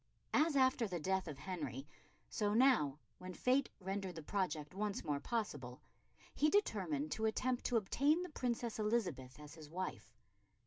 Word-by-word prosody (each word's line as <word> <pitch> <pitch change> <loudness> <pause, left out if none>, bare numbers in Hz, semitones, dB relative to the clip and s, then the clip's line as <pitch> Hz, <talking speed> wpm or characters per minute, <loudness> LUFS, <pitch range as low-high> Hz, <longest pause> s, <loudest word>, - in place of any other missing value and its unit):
As 310 -1 +4
after 260 -3 +4
the 180 -3 -3
death 190 +3 0
of 150 -3 -5
Henry, 145 -4 -5 0.4
so 210 -1 0
now 225 - +4 0.2
when 185 0 -7
fate 260 +2 +2
rendered 190 -1 -3
the 160 - -7
project 155 -5 -2
once 205 +1 -2
more 145 -2 -1
possible, 145 - -3 0.5
he 305 - +3
determined 180 - +1
to 220 - -1
attempt 245 +3 0
to 245 - +3
obtain 285 - +2
the 360 - -6
Princess 240 -5 -2
Elizabeth 180 - -1
as 150 0 -10
his 155 -2 -11
wife. 185 +3 -5
190 Hz, 155 wpm, -37 LUFS, 150-240 Hz, 0.5 s, As